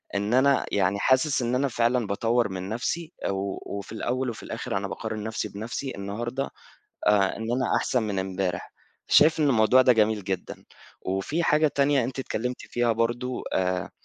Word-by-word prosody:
إن 100 +3 0
أنا 140 +1 +4
يعني 100 0 +1
حاسس 130 +2 +3
إن 120 +1 0
أنا 140 +2 +2
فعلًا 120 -2 +1
باطوّر 115 +2 +1
من 95 +1 -5
نفْسِي 155 +9 -3 0.2
و 100 0 -2 0.2
وفي 100 - -8
الأول 125 +3 -2
وفي 110 - -10
الآخر - - -3
أنا - - -2
باقارن 110 -1 -5
نفْسِي 110 0 -3
بنفْسِي 115 +6 -5
النهارده 120 +7 -3 0.6
آآ 100 -2 +3
إن - - -6
أنا 125 0 +1
أحسن 125 -3 0
من 100 -3 -2
امبارح، 95 -2 -3 0.4
شايف 160 +1 +5
إن 150 - +4
الموضوع 125 +1 +5
ده 125 - +6
جميل 110 -3 +2
جدًا، 95 -2 -4 0.4
وفي 95 - -1
حاجة 155 0 +4
تانية 140 -2 +2
أنتِ 130 +2 -5
اتكلمتِ 125 -1 -3
فيها 120 -1 0
برضه 120 +3 -1
آآ 90 -1 0
115 Hz, 170 wpm, -26 LUFS, 100-130 Hz, 0.6 s, ده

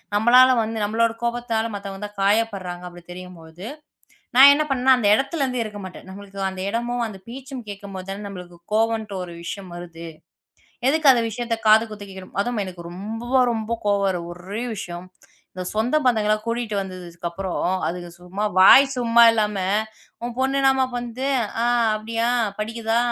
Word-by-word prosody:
நம்மளால் 250 +4 +6
வந்து 225 +1 -4
நம்மளோட 225 +2 +1
கோபத்தால் 235 -1 -1
மத்தவங்க 195 -1 -7
தான் 205 0 -11
காயப்படுறாங்க. 195 -4 0
அப்படி 175 -1 -12
தெரியும்பொழுது 180 0 -10 0.7
நான் 270 +2 +10
என்ன 305 +1 +1
பண்ணேன். 260 0 +4
அந்த 220 -5 +1
இடத்தில் 275 +6 -1
இருந்து 250 -2 -1
இருக்க 210 -1 -7
மாட்டேன். 185 0 -10
நமக்கு 200 0 -10
அந்த 190 0 -6
இடமும், 240 +2 -2
அந்தப் 195 -3 -10
பேச்சும் 260 -1 -8
கேட்கும்போது 195 -2 -8
தான் 200 +1 -6
நம்மளுக்கு 180 -3 -10 0.2
கோபம் 225 +1 +2
என்று 205 -2 -8
ஒரு 175 -1 -9
விஷயம் 195 0 -6
வருகிறது. 170 -1 -9 0.8
எதுக்கு 300 -1 +5
அந்த 235 -2 +1
விஷயத்தைக் 230 0 -4
காது 220 +1 +7
குத்து 205 -1 -9
கேட்கவேண்டும். 190 0 -8
அதுவும் 240 -2 -2
எனக்கு 175 -2 -9
ரொம்ப 220 +6 -6 0.2
ரொம்ப 220 0 -4 0.2
கோபம் 200 -1 +2
வரும் 175 -2 -3
ஒரே 190 +6 -6
விஷயம். 175 -2 -7 0.7
சொந்த 225 +6 +1
பந்தங்களை 215 -4 +3
கூட்டிவிட்டு 230 -2 -2
வந்ததுக்கு 180 -3 -6
அப்புறம் 185 +1 -4 0.3
அதுங்க 175 +1 -5
சும்மா 180 +4 -5
வாய் 190 +8 +9
சும்மா 235 -1 +4
இல்லாமல் 210 -1 0 0.4
உன் 240 0 -3
பொண்ணு 265 +1 +1
என்னம்மா 265 -1 +4
பண்ணுது. 245 +2 -4 0.4
அ - - +1 0.3
அப்படியா? 230 +2 -2 0.3
படிக்குதா? 225 +1 -1
215 Hz, 160 wpm, -22 LUFS, 190-235 Hz, 0.8 s, நான்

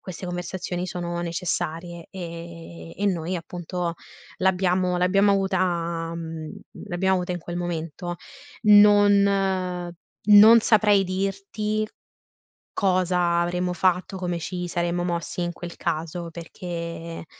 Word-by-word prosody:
queste 185 0 -7
conversazioni 180 0 -4
sono 175 -1 -4
necessarie 170 -1 -3
e 170 -2 -8
e 205 - -1
noi, 180 -2 -1
appunto, 175 0 -4 0.4
l'abbiamo 185 -1 +1
l'abbiamo 195 +3 +3
avuta 175 -4 0
mhmm, 160 -2 -6 0.4
l'abbiamo 190 +2 +1
avuta 180 -1 -1
in 175 - -3
quel 175 +1 -6
momento. 175 0 -4 0.5
Non 200 -3 +4 0.3
non 215 +3 +9
saprei 210 -3 +4
dirti 195 +3 -2 0.9
cosa 180 -2 +2
avremmo 180 +1 -1
fatto, 185 +2 +1
come 175 -2 -2
ci 180 +2 -4
saremmo 175 0 -1
mossi 175 0 -3
in 175 0 -2
quel 175 0 -8
caso 170 +1 -3
perché, 170 -1 -6
180 Hz, 110 wpm, -24 LUFS, 170-190 Hz, 0.9 s, non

